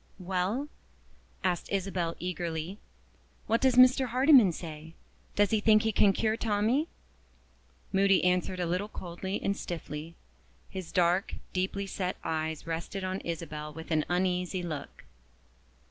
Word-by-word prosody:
"WELL?" 190 +8 -1 0.8
asked 180 -2 -1
Isabel 185 -4 -1
eagerly, 175 +1 -4 0.7
"what 230 +1 +1
does 260 -2 +4
Mr. 255 +1 +6
Hardyman 255 - +6
say? 160 -1 -8 0.4
Does 205 -1 +3
he 220 - +3
think 215 0 +5
he 220 - +2
can 200 -1 +5
cure 215 +2 +1
Tommie?" 225 +7 +1 1.1
Moody 195 0 +4
answered 180 0 +1
a 175 - 0
little 180 +4 -1
coldly 190 0 -5
and 200 - +1
stiffly. 165 -2 -6 0.6
His 185 -3 -6
dark, 180 +1 +2 0.2
deeply 190 +2 -1
set 185 -1 -3
eyes 160 -1 -2
rested 165 +4 -4
on 185 +1 -2
Isabel 155 -2 -5
with 160 +2 -9
an 155 -1 +3
uneasy 180 0 0
look. 155 -4 -6
185 Hz, 130 wpm, -30 LUFS, 170-205 Hz, 1.1 s, Mr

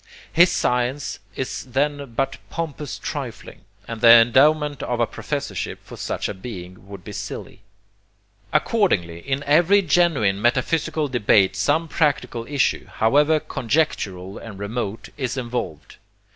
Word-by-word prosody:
His 175 +2 +6
science 125 +3 -1 0.2
is 130 - -4
then 140 0 -2
but 135 +2 -1
pompous 155 -4 -5
trifling; - - -6 0.3
and 115 -1 -6
the 115 - +7
endowment 140 +6 +5
of 120 -1 -2
a 120 - +4
professorship 140 - -4
for - - -11
such - - -3
a - - -4
being 95 -3 -9
would 100 -3 -10
be - - -8
silly. - - -7 0.9
Accordingly, 95 - +1
in 135 +8 -3
every 175 +8 +4
genuine 145 - +2
metaphysical 150 +6 +1
debate 105 -6 +3
some 155 +12 +1
practical 130 -7 0
issue, 140 -2 0
however 145 +7 +3
conjectural 105 - -2
and 110 -4 -9
remote, 105 +1 -4
is 130 -2 -3
involved. 120 - -5
125 Hz, 130 wpm, -22 LUFS, 110-150 Hz, 0.9 s, the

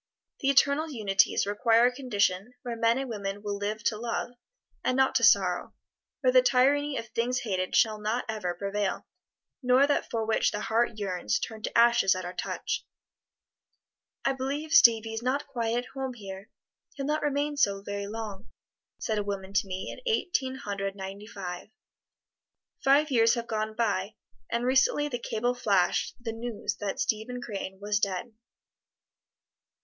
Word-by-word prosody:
The 270 - +1
Eternal 280 +3 +3
Unities 205 -10 +2
require 225 +3 +3
a 250 - +4
condition 210 -3 0
where 240 -2 -4
men 230 +1 +2
and 270 0 -3
women 205 -3 -5
will 205 -1 -2
live 210 +1 -3
to 215 -1 0
love, 235 +1 -3 0.5
and 255 - +1
not 265 0 +3
to 240 - +2
sorrow; 195 -6 +3 0.5
where 255 -2 +3
the 255 - +8
tyranny 275 +3 +3
of 230 - -5
things 245 +3 -1
hated 185 -5 -2
shall 215 -2 +3
not 220 +4 -1
ever 210 -6 -3
prevail, 200 +1 -2 0.6
nor 255 +2 +5
that 285 - 0
for 225 -1 -1
which 220 - +2
the 210 - -4
heart 230 +2 +1
yearns 180 - -1
turn 220 -1 -6
to - - -2
ashes 235 -5 +5
at 185 -1 -5
our 180 - -5
touch. - - -3 1.4
"I 270 - +3
believe 280 +4 -3
Stevie 225 -6 +6
is 225 - -3
not 260 +4 -1
quite 235 -4 -2
at 245 - -2
home 265 -2 -4
here 195 -2 -9 0.5
he'll 275 - -4
not 300 +2 0
remain 290 0 0
so 200 -8 +1
very 200 0 -4
long," 215 -1 -6 0.5
said 215 -1 -1
a - - -1
woman 195 -1 -5
to 195 0 +1
me 185 0 -4
in - - -9
Eighteen 265 -11 0
Hundred 195 -4 -4
Ninety 195 +1 -7
five. 185 -3 -7 1.1
Five 285 +2 +4
years 230 -1 +4
have 235 -1 -3
gone 215 -1 -3
by, 205 -3 -1 0.3
and 235 +1 -1
recently 270 +3 +3
the 245 -3 -3
cable 240 +1 -1
flashed 200 -7 +1
the 230 -2 -4
news 230 -1 -4
that 205 -2 -4
Stephen 220 +3 -1
Crane 195 -5 -6
was 205 +1 0
dead. 200 +3 -2
225 Hz, 165 wpm, -28 LUFS, 200-250 Hz, 1.4 s, the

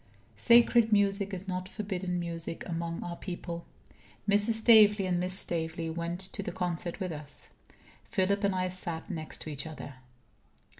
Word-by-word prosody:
Sacred 235 -1 +6
music 200 -1 +2
is 190 0 -6
not 185 0 -3
forbidden 190 -4 -3
music 170 -1 -5
among 165 0 -3
our 175 0 -5
people. 175 -2 -6 0.6
Mrs. 205 +2 +3
Staveley 215 -3 +6
and 180 -1 +1
Miss 180 +1 0
Staveley 165 -2 0
went 170 +1 -3
to 190 0 -2
the - - -4
concert 175 0 -3
with 185 -3 -3
us. 150 -2 -8 0.5
Philip 200 +2 0
and 200 -1 +2
I 185 0 0
sat 175 0 -4
next 160 -3 -4
to 155 - -6
each 145 +2 -4
other. 145 -4 -9
180 Hz, 155 wpm, -30 LUFS, 170-200 Hz, 0.6 s, Sacred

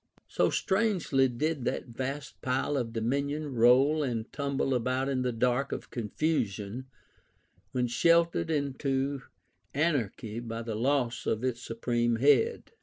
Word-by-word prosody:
So - - +2
strangely 190 -10 +2
did 145 +3 -2
that - - -2
vast 135 +4 -5
pile 130 +3 0
of 120 -4 -1
dominion 140 +5 -1
roll 130 +6 +5
and 120 -5 -3
tumble 140 -2 -1
about 130 +2 0
in 135 -2 0
the 125 -1 0
dark 125 +3 0
of - - -5
confusion, 115 -2 -2 0.8
when 125 -1 0
shattered 170 +7 +3
into 140 -2 -1 0.5
anarchy 120 - -1
by 115 -1 -5
the 115 -1 -4
loss 125 +1 0
of 110 +2 0
its 125 -2 -1
supreme 120 0 0
head. 145 - +3
130 Hz, 130 wpm, -29 LUFS, 120-145 Hz, 0.8 s, roll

